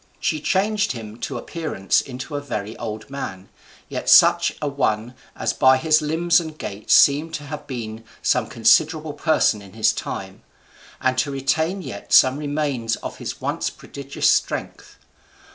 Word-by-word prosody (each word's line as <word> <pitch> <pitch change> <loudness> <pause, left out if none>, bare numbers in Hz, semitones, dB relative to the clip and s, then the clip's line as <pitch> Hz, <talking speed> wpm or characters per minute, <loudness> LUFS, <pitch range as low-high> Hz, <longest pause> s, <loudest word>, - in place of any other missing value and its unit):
She 155 -2 -1
changed 205 +4 +1
him 110 -2 -8
to - - -4
appearance 155 - -1
into 130 +3 -7
a 145 - -2
very 110 -5 -5
old 110 0 -6
man, 100 -9 -6 0.4
yet - - -4
such - - +6
a 150 - -2
one 120 -4 -1 0.2
as - - -1
by 130 0 +5
his 155 +2 +3
limbs 165 +3 +2
and 160 -2 -7
gait 100 -5 -7
seemed 150 +4 +5
to 150 - -6
have 150 +1 -8
been 115 -4 -6 0.2
some 125 -3 +2
considerable 155 +6 +2
person 150 -8 +2
in 100 -2 -14
his 110 -1 +2
time, - - -6 0.6
and 130 0 +1
to 145 - 0
retain 160 +7 -1
yet 100 -8 -7
some 130 +1 +6
remains 145 -6 -1
of - - -8
his - - -6
once - - -2
prodigious 140 0 -4
strength. - - -1
140 Hz, 160 wpm, -22 LUFS, 115-155 Hz, 0.6 s, such